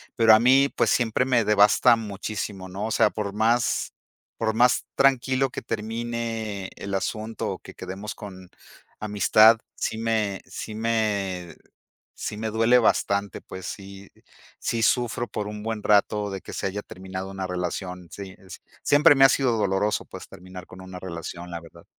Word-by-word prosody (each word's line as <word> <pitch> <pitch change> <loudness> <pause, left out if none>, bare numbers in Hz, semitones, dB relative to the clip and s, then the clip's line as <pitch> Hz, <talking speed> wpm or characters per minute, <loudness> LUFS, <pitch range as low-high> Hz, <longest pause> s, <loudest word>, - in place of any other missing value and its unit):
Pero 110 -1 +7
a - - +4
mí, 135 +4 +5
pues - - +2
siempre 120 +1 +1
me 125 -4 +2
devasta 105 +3 +5
muchísimo, 100 -3 -5
¿no? 100 +3 -4
O - - -4
sea, 110 -1 +4
por 100 -2 -4
más 115 +2 +1 0.5
por 110 -1 0
más 120 +3 +3
tranquilo 135 0 +2
que - - -6
termine 115 -3 -4
el 100 0 -6
asunto 110 +3 -3
o - - -6
que - - -12
quedemos 95 +4 -7
con 95 -4 -10 0.5
amistad, 110 +2 +5 0.2
sí 110 - -3
me 110 -4 -1
sí 110 - -7
me 100 -7 -1 0.6
sí 105 - -5
me 110 0 -3
duele 115 +3 +4
bastante, 100 -3 +1
pues 95 -1 -9
sí, 100 0 -9 0.5
sí 115 -1 -1
sufro 120 +1 +1
por 105 -1 -4
un 105 0 -7
buen 110 -1 -4
rato 105 0 +2
de 95 - -5
que - - -10
se - - -4
haya 105 +2 -4
terminado 95 0 -7
una 95 -1 -4
relación. 90 0 -4
Sí, 100 -2 -8
eh, 95 - -19 0.4
siempre 145 0 +6
me 135 - +5
ha - - +7
sido 130 -4 +2
doloroso, 105 +1 0
pues - - -10
terminar 90 0 -11
con 95 0 -12
una 95 -1 -9
relación, 85 0 -7
la 85 -1 -5
verdad. 85 - -16
105 Hz, 170 wpm, -25 LUFS, 95-115 Hz, 0.6 s, Pero